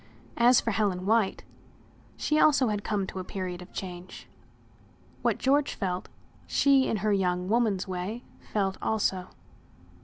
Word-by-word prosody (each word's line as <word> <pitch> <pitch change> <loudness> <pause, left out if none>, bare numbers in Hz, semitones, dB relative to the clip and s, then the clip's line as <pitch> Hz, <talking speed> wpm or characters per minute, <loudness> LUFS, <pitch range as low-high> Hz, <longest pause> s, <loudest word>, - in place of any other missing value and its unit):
As 245 +1 +6
for 230 - -1
Helen 195 -4 0
White, 220 -1 +2 0.7
she 305 0 +1
also 280 -6 +4
had 205 -1 -2
come 205 -3 -1
to 190 - -6
a - - -4
period 185 -1 -5
of 180 - -12
change. 180 -1 -8 0.9
What - - +1
George 280 +2 +2
felt, 185 -2 -3 0.4
she 275 -2 +4
in 220 - 0
her 210 - +3
young 180 -2 0
woman's 210 -3 +1
way 190 +6 -4 0.3
felt 195 -2 0
also. 190 -4 0
200 Hz, 145 wpm, -28 LUFS, 185-230 Hz, 0.9 s, As